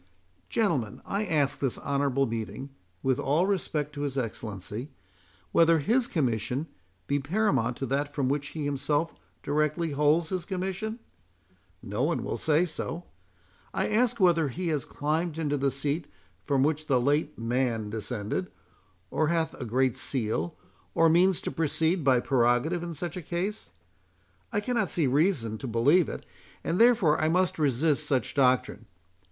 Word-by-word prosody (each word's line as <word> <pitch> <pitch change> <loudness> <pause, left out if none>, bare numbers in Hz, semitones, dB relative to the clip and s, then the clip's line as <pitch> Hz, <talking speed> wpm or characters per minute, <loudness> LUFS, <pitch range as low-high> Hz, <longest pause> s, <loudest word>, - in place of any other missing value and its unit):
Gentlemen, 150 - 0
I 205 +2 -1
ask 150 -7 +1
this 135 -4 -1
honourable 140 -1 +1
meeting, 115 +4 -5 0.3
(with 130 -1 +1
all 150 +6 +2
respect 155 -7 -1
to 145 - -5
his 140 -2 -2
Excellency,) 110 0 -4 0.6
whether 165 +4 +5
his 235 - +2
Commission 125 - -1 0.4
be 145 - 0
paramount 135 - +1
to 135 - -3
that 140 +2 -1
from 140 -3 +1
which 145 +1 -1
he 150 0 -5
himself 145 +3 0 0.3
directly 150 +3 0
holds 150 +3 +2
his 185 -2 -2
commission? 190 +4 -3 0.9
No 105 +4 -3
one 160 +5 +1
will - - -3
say 160 +2 +3
so. 165 0 -5 0.7
I - - 0
ask 235 +2 +2
whether 170 -5 +4
he 170 +6 -3
has 150 -5 -1
climbed 155 +2 -2
into 150 -3 0
the 140 -1 +1
seat 145 +4 -2 0.4
from 140 -2 +2
which 155 +1 0
the 130 -3 +3
late 145 +4 +1
Man 115 -2 -1
descended, 110 - -3 0.6
or 155 - +1
hath 165 -1 0
a - - -3
great 130 +2 +1
seal, 110 - -1 0.4
or 165 0 +5
means 180 +2 +4
to - - -3
proceed 165 +2 0
by 130 -3 +4
prerogative 130 +7 +2
in 170 -1 -5
such 175 +3 -5
a - - -4
case? 180 +6 -3 0.8
I 205 -3 0
cannot 225 -4 0
see 165 - +1
reason 130 - +1
to 135 - -5
believe 135 +9 +3
it, - - -7 0.4
and 170 - -1
therefore 230 -11 +5
I 155 - +2
must 180 0 +1
resist 150 +1 +1
such 130 -5 0
doctrine. 130 -3 +2
150 Hz, 155 wpm, -28 LUFS, 130-170 Hz, 0.9 s, whether